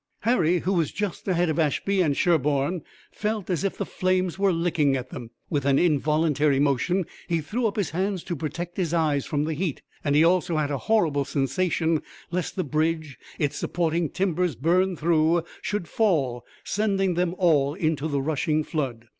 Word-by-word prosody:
Harry, 180 -7 +3
who 190 - 0
was 165 -5 +1
just 205 -2 -4
ahead 175 -2 +2
of 155 0 -1
Ashby 185 +6 +1
and 145 -5 +1
Sherburne, 150 0 +1 0.3
felt 210 -3 -3
as 175 0 -1
if 195 - -1
the - - -2
flames 185 -1 0
were 200 -1 +3
licking 165 -5 +1
at 130 0 -7
them. 120 -3 -7 0.2
With 145 -4 -1
an 140 0 +3
involuntary 150 -2 +2
motion 145 +6 +1 0.2
he 170 -1 +1
threw 220 +11 -1
up 210 - -3
his 200 -7 -1
hands 185 +2 -1
to 175 - -3
protect 165 +4 -5
his 175 -3 0
eyes 150 -4 +1
from 145 -1 0
the 160 +1 -1
heat, 160 -1 -3 0.2
and 145 -1 +1
he 150 - +6
also 175 -1 +2
had 150 -1 0
a 140 - -1
horrible 160 -11 +3
sensation 155 +4 0 0.3
lest 180 0 -2
the 185 - 0
bridge, 155 -1 -1 0.2
its 145 -3 -1
supporting 165 -2 0
timbers 180 -4 0
burned 175 - +1
through, 165 +1 +2 0.2
should 205 -5 -3
fall, 145 - +1 0.2
sending 195 -3 0
them 175 0 0
all 150 -5 +3
into 160 -4 0
the 140 -3 -1
rushing 155 +1 0
flood. 130 -8 -3
165 Hz, 180 wpm, -25 LUFS, 145-180 Hz, 0.3 s, he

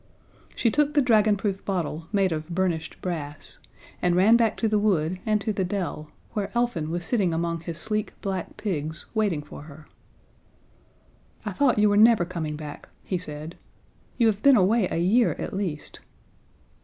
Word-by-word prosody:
She 230 - +2
took 295 +2 +1
the 290 - +5
dragonproof 210 -4 +2
bottle, 165 -4 -3
made 195 -3 +2
of 155 0 -4
burnished 170 -2 -2
brass, 150 -5 -5 0.4
and 175 -1 +2
ran 200 +6 +6
back 230 -2 +2
to 225 - +1
the 215 -1 +2
wood, 185 -4 +1
and 215 -1 +3
to 215 - -1
the 195 - -1
dell, 180 -5 -3 0.2
where 205 -3 -2
Elfin 235 -11 0
was 175 +1 -3
sitting 190 -8 +1
among 170 0 -1
his 165 -1 -6
sleek 215 +2 -1
black 190 -3 -4
pigs, 160 -6 -3
waiting 205 -9 0
for 145 - -11
her. 150 0 -13 1.6
"I - - -2
thought 280 -5 +2
you 210 0 +5
were 205 0 +3
never 220 -4 +6
coming 165 -4 -4
back," 150 -1 -9
he 185 - -2
said. 155 -1 -7 0.6
"You 235 - +3
have 215 -2 +2
been 275 -2 +6
away 200 +1 +3
a - - -2
year, 210 +8 +3
at - - -5
least." 185 -7 -4
190 Hz, 170 wpm, -25 LUFS, 165-215 Hz, 1.6 s, ran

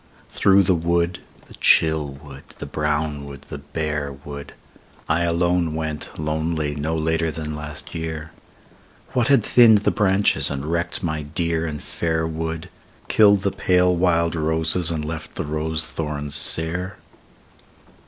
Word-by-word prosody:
Through 100 0 +5
the 95 - +3
wood, 85 +1 0 0.3
the - - -15
chill 80 -2 +3
wood, 70 0 -11 0.2
the - - -6
brown 75 -1 -1
wood, 70 -1 -10
the 75 - -5
bare 75 0 -3
wood, 70 +1 -9 0.5
I 80 +1 +2
alone 85 -1 +1
went 80 -1 -4
lonely 80 -1 -1
no 75 +3 -2
later 80 +1 0
than 75 -1 -5
last 75 0 -6
year, 80 -1 -5 0.8
What 120 -2 +2
had 140 -1 +5
thinned 110 -4 +6
the - - +3
branches, 100 0 +2
and 70 0 -4
wrecked 85 +4 -1
my 80 -2 -1
dear 85 +2 -1
and 75 -2 -5
fair 80 -1 -1
wood, 80 +1 -4 0.4
Killed 100 -2 +5
the 100 - +1
pale 90 0 +3
wild 85 -1 +2
roses 80 +2 +1
and 80 -2 -2
left 80 0 -6
the - - -3
rose 80 +1 -2
thorns 75 -2 -4
sere 85 +6 0
80 Hz, 145 wpm, -22 LUFS, 75-85 Hz, 0.8 s, thinned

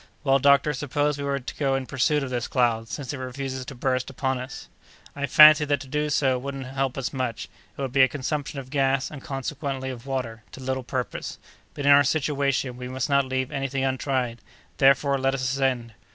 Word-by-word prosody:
"Well, 135 -1 +4
doctor, 140 +2 +4
suppose 145 +1 -1
we - - -3
were 140 0 0
to 125 - -7
go 135 -2 +1
in 135 -1 -2
pursuit 140 +3 +1
of 130 - -5
this 120 -1 -2
cloud, 115 -3 +1
since 140 -2 -5
it 140 - -6
refuses 130 0 -5
to 135 - -8
burst 130 +1 -1
upon 130 -1 -2
us?" 125 0 -8 0.5
"I 140 0 -2
fancy 150 +2 +8
that 145 -1 +1
to 135 - -10
do 150 +2 -1
so 135 -3 +2
wouldn't 135 0 -5
help 135 0 -2
us 135 - -3
much; 130 -4 -3 0.3
it - - -5
would 135 - -3
be 135 +1 +4
a 130 - +7
consumption 145 +1 -3
of 130 -1 -7
gas, 135 -2 +1
and, 145 -3 -8
consequently, 135 0 -4
of 125 +1 -10
water, 125 -5 -3
to - - -9
little 130 0 -2
purpose; 125 0 -4 0.4
but, 145 - -4
in 145 - +6
our 140 0 +8
situation, 140 -3 0
we 125 0 -6
must 130 +2 -3
not 140 -1 +4
leave 130 0 -2
anything 135 0 -2
untried; 130 -2 -1 0.4
therefore, 140 0 +4
let 135 +1 +1
us 130 - -3
ascend!" 130 -3 0
135 Hz, 210 wpm, -25 LUFS, 130-140 Hz, 0.5 s, fancy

